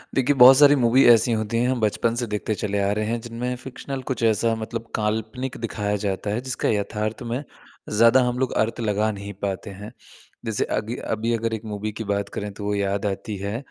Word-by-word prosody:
देखिए, 135 +2 +3
बहुत 130 +1 +9
सारी 145 0 +7
मूवी 125 0 +4
ऐसी 120 0 +6
होती 110 0 -1
हैं 120 +2 +2
हम 130 -1 0
बचपन 110 +2 +1
से 120 - -1
देखते 105 +1 -2
चले 105 -1 -2
आ 100 0 +1
रहे 105 +1 -1
हैं 115 +2 -1
जिनमें 120 +2 -4
फ़िक्शनल 130 +2 -7
कुछ 130 - -3
ऐसा 115 +1 +2
मतलब 115 +1 -5
काल्पनिक 110 +4 -2
दिखाया 105 -2 -2
जाता 100 0 -2
है 105 +3 -1
जिसका 130 -1 -2
यथार्थ 105 +1 -2
में 130 +5 -2 0.5
ज़्यादा 115 +4 +5
हम 125 0 -2
लोग 130 -1 0
अर्थ 115 +2 0
लगा 105 0 +1
नहीं 100 0 -7
पाते 100 +1 -3
हैं। 100 +3 -9 0.5
जैसे 110 -2 -1
अगी 110 +3 -3 0.2
अभी 115 +2 -1
अगर 115 0 -1
एक 110 0 -5
मूवी 105 0 -4
की - - -2
बात 100 -1 -2
करें 105 0 -5
तो 105 - -9
वो 105 - 0
याद 100 0 -1
आती 100 +1 -3
है 100 +3 -3
110 Hz, 215 wpm, -23 LUFS, 105-120 Hz, 0.5 s, बहुत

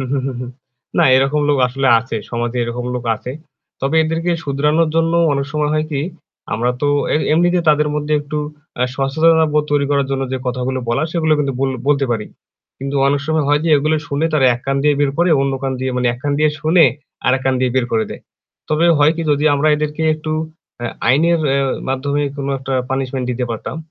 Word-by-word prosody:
হু, - - -2
হু, 140 - +1
হু, 135 - -2
হু। 125 - -5 0.5
না, - - +5
এরকম 135 +3 +2
লোক 145 - +2
আসলে 135 +2 0
আছে। 115 -1 -5
সমাজে 120 +1 -2
এরকম 120 +1 -4
লোক 125 - -4
আছে। 125 - -7 0.5
তবে 140 +4 0
এদেরকে 165 +2 -1
শুধরানোর 150 +3 +1
জন্য 165 0 +2 0.2
অনেক 140 0 -1
সময় 150 -1 0
হয় 155 0 +1
কি 140 -2 -1 0.5
আমরা 120 +3 0
তো 145 - +2 0.3
এ - - +4 0.2
এমনিতে 175 +3 +3
তাদের 150 0 +3
মধ্যে 150 0 -2
একটু 145 +1 -6 0.4
আ - - +3
সচেতনতাবোধ 150 +2 +2
তৈরি 145 -1 +2
করার 140 -1 +2
জন্য 135 0 -1
যে 130 - -1
কথাগুলো 125 +1 -2
বলার 140 +7 +1
সেগুলো 160 -2 +1
কিন্তু 140 -2 0
বল 135 0 +1 0.2
বলতে 140 -1 +3
পারি। 110 -3 -1 0.5
কিন্তু 140 +1 -3
অনেক 140 +1 +1
সময় 155 -2 +1
হয় 145 0 +3
যে - - 0
এগুলো 155 +2 +1
শুনে 145 +3 0
তারা 145 -4 +3
এক 120 - -8
কান 135 0 0
দিয়ে 150 0 +3
বের 145 -1 +2
করে 175 +1 +3
অন্য 135 0 0
কান 135 -1 -1
দিয়ে 130 0 -1
মানে 125 0 0
এক - - -13
কান 145 - 0
দিয়ে 155 0 +3
শুনে 165 +2 +5 0.4
আরেক 130 +1 +2
কান 130 0 +2
দিয়ে 130 -1 +1
বের 125 -2 +2
করে 110 -1 +2
দেয়। - - -8 0.5
তবে 155 +2 +2
হয় 150 +2 +5
কি 165 - -2
যদি 145 +1 +1
আমরা 145 +2 +2
এদেরকে 150 +1 -3
একটু 155 0 -5 0.5
আ - - 0 0.2
আইনের 165 +5 +3 0.5
মাধ্যমে 140 +2 -1
কোনো 140 0 -3
একটা 135 0 -4 0.2
পানিশমেন্ট 130 -1 -2
দিতে 125 0 -2
পারতাম। 115 +6 -5
140 Hz, 210 wpm, -18 LUFS, 130-155 Hz, 0.5 s, না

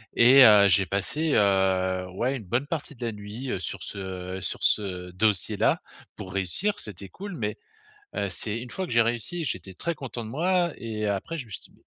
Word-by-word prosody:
Et 130 +3 +8
heu, 105 -3 +8
j'ai 95 +1 +4
passé, 145 - 0
heu, 95 -2 +2
ouais, 125 +8 -1
une 110 -7 -11
bonne 125 +5 +1
partie 155 -2 -4
de 120 -1 -5
la 115 - -1
nuit, 105 +5 -7
heu, - - -2
sur 90 - -5
ce, - - -5
heu 95 0 -5
sur 90 - -2
ce 90 -3 +1
dossier 100 0 +1
là, - - +2 0.4
pour 95 - -8
réussir. 100 - 0
C'était 100 -2 -9
cool, 195 - -8
mais, 105 -3 -3 0.6
heu 100 - 0
c'est 110 +5 -4
une 125 - -8
fois 190 - -3
que - - -11
j'ai 115 - +5
réussi, 120 +9 -1
j'étais 95 - -5
très 170 - -3
content 125 -6 -6
de 110 - -7
moi 175 +4 +1
et, 110 -2 -4
après, 100 +12 -3
je 135 - -6
me - - -17
suis - - -6
dit: - - -17
105 Hz, 220 wpm, -26 LUFS, 95-135 Hz, 0.6 s, Et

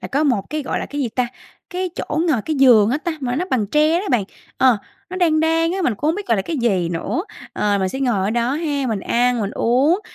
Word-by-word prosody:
là - - -6
có 290 +3 +1
một 235 -9 0
cái 305 -1 -2
gọi - - -2
là - - -4
cái 290 - -5
gì 255 - 0
ta? 250 +2 -1 0.4
Cái 365 -1 -3
chỗ 305 - -4
ngồi, 245 -9 +1
cái 310 -2 -2
giường 235 -5 +6
á 285 - 0
ta, 340 +1 -3
mà 250 -1 -2
nó 355 - 0
bằng 220 -5 +1
tre 305 - +3
đó 400 - -6
bạn. 230 -6 +2 0.3
Ờ, 255 -4 +5 0.3
nó 370 - -5
đan 320 -4 +2
đan 325 +1 +2
á, 385 - -2
mình 250 -9 +1
cũng 295 +9 -2
hông 325 - +2
biết 410 0 -6
gọi 230 - +2
là 195 - -1
cái 320 - -4
gì 195 -9 +1
nữa. 175 - -2 0.3
Ờ, 205 -1 0
mình 190 - 0
sẽ 265 +8 -5
ngồi 245 -6 +1
ở 205 - 0
đó 240 +2 0
ha, 290 -4 -1
mình 215 -4 -2
ăn, 245 +2 +1
mình 200 - -2
uống, 270 - +2
265 Hz, 280 wpm, -20 LUFS, 230-315 Hz, 0.4 s, giường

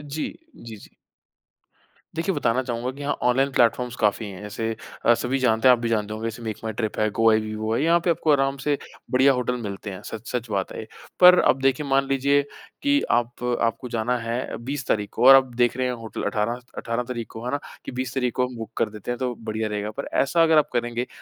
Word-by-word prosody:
जी, 155 - -1 0.3
जी, 115 -2 -10
जी। - - -14 1.3
देखिए 180 +4 0
बताना 130 -2 +1
चाहूँगा 125 0 -3
कि 140 +2 -11
यहाँ 145 - 0
ऑनलाइन 135 +3 +3
प्लेटफ़ॉर्म्स 125 0 +2
काफ़ी 105 +1 +2
हैं 100 -1 -8
अ, - - -7
ऐसे 110 +2 -3 0.4
सभी 130 +4 -1
जानते 115 0 +3
हैं 125 - +9
आप 120 - +1
भी 115 -1 -2
जानते 105 -1 -1
होंगे 110 +1 -4
जैसे 115 +2 -9
मेक 110 -2 -4
माई 110 -1 -3
ट्रिप 110 -1 -3
है, 110 0 +2
गो 115 +2 +3
आई 110 - +4
बीबो 110 +1 -3
है, 130 - 0
यहाँ 170 +1 +4
पे - - +2
आपको 160 -2 +2
आराम 135 -1 +2
से 145 +1 0 0.3
बढ़िया 135 +2 +5
होटल 125 0 -1
मिलते 100 0 -6
हैं 95 +2 -8
सच-सच 115 +1 -5
बात 95 -2 -2
है - - -6
ये 110 - -7 0.3
पर 180 0 +9
अब 135 - +3
देखिए 135 +2 +1
मान 135 0 +2
लीजिए 140 +1 +2 0.4
कि 285 0 +3
आप 120 +1 0 0.2
आपको 115 +2 -1
जाना 120 +2 0
है 115 +2 -3
20 140 -1 -4
तारीख 105 -1 0
को - - +1
और 135 - +11
आप 130 -2 +3
देख 120 0 +2
रहे 130 0 0
हैं 125 - -1
होटल 115 -2 -6
18 115 +3 -1 0.2
18 115 +1 -2
तारीख 120 -2 -5
को 115 +2 -8
है 125 - -2
ना? 145 - -1 0.3
कि - - -5
20 125 0 -4
तारीख 125 -2 0
को 125 0 +1
हम 125 - -10
बुक 115 0 -7
कर - - +1
देते 105 +3 -6
हैं 120 - -2
तो 125 -1 -1
बढ़िया 110 0 -3
रहेगा 105 0 -3
पे - - -1 0.2
ऐसा 165 +5 +3
अगर 160 -1 +4
आप 150 - +3
करेंगे 120 0 -1
120 Hz, 240 wpm, -24 LUFS, 110-135 Hz, 1.3 s, और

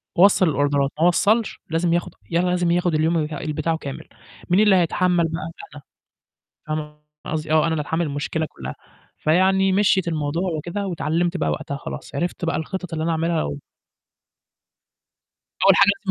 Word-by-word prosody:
وصّل 185 -1 +5
الأوردرات 140 -1 +1
ما 170 - +5
وصّلش 215 +5 +2
لازم 165 +1 +1
ياخد 175 - -1 0.2
لازم 175 0 +1
ياخد 175 -1 +1
اليوم 160 +2 +2
ال 155 0 -3
بتاعه 165 +2 -1
كامل. 140 -4 -7 0.4
مين 180 +3 +4
اللي 210 -2 +5
هيتحمّل 180 0 +2
بقى؟ 165 0 -5 0.2
أنا، 145 - -10 0.9
فاهمة 150 -1 -4 0.3
قصدي 155 0 -3
آه، 155 0 +5
أنا - - -1
اللي 155 - -1
هاتحمّل 160 +3 -1
المشكلة 145 +2 -2
كلّها، 65 0 -8 0.4
فيعني 190 +4 +3
مشيِت 190 -2 +3
الموضوع 165 +3 -1
وكده، 195 +6 -4
واتعلّمت 170 +2 -1
بقى - - 0
وقتها 140 - -3
خلاص، 140 - -8
عرفت 175 +2 -2
بقى 165 - 0
الخِطَط 180 +1 -4
اللي 155 - -2
أنا 165 - 0
أعملها 165 +1 0
لو 70 0 -3 2.0
أول 195 -1 +7
حاجة 200 0 +6
لازم 190 - 0
165 Hz, 160 wpm, -22 LUFS, 155-180 Hz, 2.0 s, أول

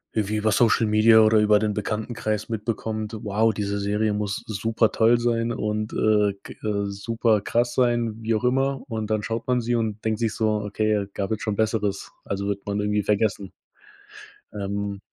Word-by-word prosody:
irgendwie 110 -1 0
über 105 0 +1
Social 115 0 +3
Media 110 +1 +6
oder 110 0 +5
über 105 0 +4
den 105 -1 0
Bekanntenkreis 105 0 -3
mitbekommt, 110 0 -3
wow, 110 +2 +2
diese 100 0 -2
Serie 105 +1 0
muss 105 -1 -3
supertoll 110 +2 +2
sein 120 -1 0
und, 105 -1 -2
äh, 105 -2 +2
g - - -10
äh, 100 -1 0
superkrass 115 +3 0
sein, 120 -3 +1
wie 115 +1 0
auch 110 +3 -1
immer 135 +2 +1
und 110 -2 -3
dann 110 -1 0
schaut 115 +1 -3
man 125 -1 +1
sie 120 0 -1
und 110 -2 -2
denkt 110 -1 0
sich 115 -2 0
so: 110 -1 0
„Okay, 105 0 0
gab 100 +1 -3
halt 110 - -2
schon 105 -2 -2
Besseres.“ 105 -3 -1
Also, 100 0 -3
wird 100 -1 -3
man 100 0 -2
irgendwie 105 0 0
vergessen. 105 -2 0 1.0
Ähm 100 0 -3
110 Hz, 175 wpm, -24 LUFS, 105-115 Hz, 1.0 s, Media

